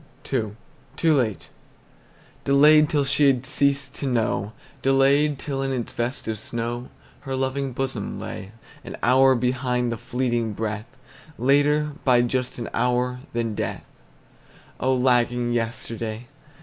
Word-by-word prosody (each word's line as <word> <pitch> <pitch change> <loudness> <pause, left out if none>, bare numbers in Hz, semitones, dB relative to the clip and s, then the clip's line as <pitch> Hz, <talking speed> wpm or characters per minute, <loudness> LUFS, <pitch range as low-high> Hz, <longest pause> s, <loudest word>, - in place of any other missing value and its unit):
II. 110 -5 -1 0.4
TOO 165 -1 +3
LATE. 105 - -1 0.9
Delayed 150 +2 +6
till 145 -4 +1
she 140 +2 +3
had 130 -2 +2
ceased 140 0 +1
to 140 - -4
know, 110 -4 0 0.3
Delayed 140 +2 +3
till 135 -1 -3
in 135 0 -1
its 125 -3 -3
vest 120 +3 -3
of 110 -2 -3
snow 120 +2 -4 0.3
Her 135 -1 -4
loving 135 +1 -1
bosom 130 -4 -3
lay. 95 +1 -7 0.3
An - - -8
hour 130 +1 +5
behind 125 0 0
the 115 - -3
fleeting 120 -3 -1
breath, 105 +1 -4 0.5
Later 145 +4 +3
by 125 -2 +4
just 125 +1 -2
an 115 - -4
hour 125 0 0
than 115 -2 -1
death, - - -4 0.9
Oh, 130 0 +2
lagging 125 -1 +2
yesterday! 115 0 -3
125 Hz, 135 wpm, -24 LUFS, 120-135 Hz, 0.9 s, Delayed